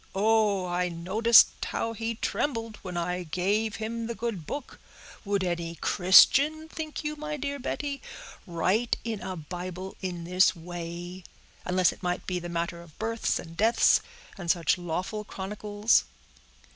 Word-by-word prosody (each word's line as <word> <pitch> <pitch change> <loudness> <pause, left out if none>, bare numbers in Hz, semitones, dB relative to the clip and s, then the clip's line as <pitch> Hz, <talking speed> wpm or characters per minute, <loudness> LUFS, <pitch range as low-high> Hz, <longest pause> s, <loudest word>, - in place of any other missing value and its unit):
Oh! 210 -2 +3
I 180 0 0
noticed 200 +7 +5
how 230 - -2
he 225 +1 -3
trembled 230 -2 -2
when 180 -2 -6
I 180 +1 -1
gave 200 +6 0
him 225 +1 -4
the 235 - -4
good 215 -8 -4
book. 285 -2 -6 0.4
Would 200 -2 0
any 170 -2 -2
Christian, 275 - +5
think 320 -1 -6
you, 300 0 -2
my 300 0 -4
dear 285 0 -3
Betty, 280 +1 -3 0.5
write 185 +7 +1
in 225 -3 -3
a 185 - -4
Bible 180 +3 -6
in 180 -3 -4
this 185 +2 +3
way; 175 +1 -7 0.4
unless 180 0 +3
it - - -13
might 180 0 -2
be 180 -1 -2
the 175 0 -7
matter 170 0 -3
of 165 -3 -16
births 225 +1 -1
and 165 0 -9
deaths, 225 +5 +4 0.4
and 175 -2 -5
such 170 -2 +3
lawful 180 +5 -3
chronicles?" 205 +2 0
190 Hz, 150 wpm, -28 LUFS, 175-225 Hz, 0.5 s, noticed